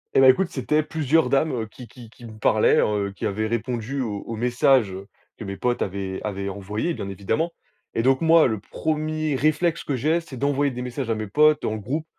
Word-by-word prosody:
Eh, 135 - +6
bah, 130 - +7
écoute, 170 +8 +3
c'étaient 150 +4 0
plusieurs 155 0 +1
dames, 150 +3 +2
heu, 115 -3 -3
qui 120 +2 -12
qui 120 -4 -13
qui 120 - -15
me 110 -2 -10
parlaient, 110 0 +3
heu, 100 -1 0
qui - - -2
avaient 110 +2 -2
répondu 120 +3 -2
aux 105 -4 -3
aux 115 - -5
messages, 125 -1 +3
heu, 95 +1 -8 0.3
que - - -7
mes 100 -1 -5
potes 120 +4 0
avaient 95 -1 -4
avaient 100 -2 -3
envoyés, 105 - -3
bien 100 - -5
évidemment 125 - -1 0.4
et 115 - +1
donc 130 0 +3
moi, 165 0 +6
le 110 -4 -2
1er 155 +5 -2
réflexe 155 +4 +1
que 140 - -2
j'ai, 155 +7 +1
c'est 145 -6 -10
d'envoyer 140 +1 +1
des 125 0 -5
messages 125 0 -4
à 115 - +1
mes 110 0 -4
potes 150 +8 +3
en 110 - -1
groupe 135 +10 -3
125 Hz, 220 wpm, -24 LUFS, 105-150 Hz, 0.4 s, bah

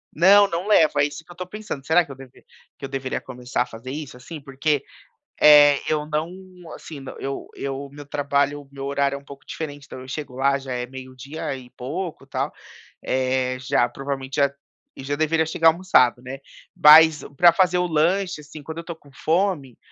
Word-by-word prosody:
Não, 200 +5 +6
não 170 +4 -3
levo, 160 -7 +4
é - - +5
isso 145 +2 -6
que - - -15
eu - - -9
estou 180 +1 -7
pensando. 195 -9 -7
Será 170 +2 +4
que 145 - -12
eu - - -8
deve 130 -1 -15 0.3
que 135 - -7
eu - - -7
deveria 135 -1 -3
começar 125 -1 -3
a - - -13
fazer 115 +2 -10
isso, 150 -1 -7
assim? 155 +6 -9
Porque, 140 +1 -1 0.6
eh, 145 -1 +8
eu 150 -1 0
não, 155 +2 -2 0.5
assim, 145 -4 -10 0.2
eu 135 0 -5
eu 140 0 -5
meu 145 0 -11
trabalho, 145 0 -1
meu 135 0 -7
horário 140 0 0
é - - -4
um - - -21
pouco 140 -1 -13
diferente, 145 -2 -7
então 130 - -10
eu 130 - -11
chego 135 -1 -6
lá 140 +1 +2
já 135 -1 -6
é 125 0 -3
meio-dia 130 +3 -7
e 125 -2 -12
pouco 160 +7 -6
tal, - - -3 0.5
eh 130 0 0
já 130 -2 +1
provavelmente 135 +1 -5
já 140 -1 +2 0.4
e - - -9
já 145 +2 -2
deveria 160 +1 +1
chegar 160 +1 +4
almoçado, 160 -8 +3
né? 130 +2 -8 0.4
Mas 155 +1 +7
pra 175 +2 +7
fazer 180 -1 +3
o 180 - +1
lanche, 175 +2 0
assim, 150 +1 -11
quando 160 +3 -7
eu - - -7
tô 170 0 -7
com 145 -3 -21
fome, 160 - -1
145 Hz, 200 wpm, -23 LUFS, 135-160 Hz, 0.6 s, eh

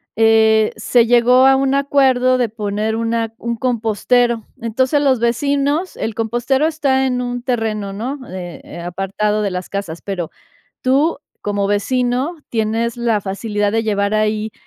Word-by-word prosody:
eh, 220 0 +4
se 230 +1 +3
llegó 245 +2 +5
a 270 0 +6
un 270 0 +1
acuerdo 265 -2 +3
de 240 -3 +1
poner 210 0 -2
una 230 0 -1
un 235 0 -3
compostero. 235 0 +1 0.2
Entonces, 260 +5 +1
los 265 -4 +2
vecinos 285 +8 0
el 225 - -3
compostero 240 +5 0
está 280 -4 +1
en 250 -1 0
un 245 0 -4
terreno, 220 -5 -2
¿no?, 250 +8 -4
eh, 180 -2 -7
eh, - - -10
Apartado 195 +4 -1
de 200 - -1
las 180 0 -5
casas, 195 -5 -5
pero 180 -5 -4 0.5
tú 275 +6 +2 0.2
como 205 -1 -1
vecino 250 - 0
tienes 225 +1 -1
la 230 -3 +1
facilidad 205 +1 -2
de 225 - +1
llevar 200 -1 0
ahí 215 0 0
230 Hz, 150 wpm, -18 LUFS, 210-255 Hz, 0.5 s, a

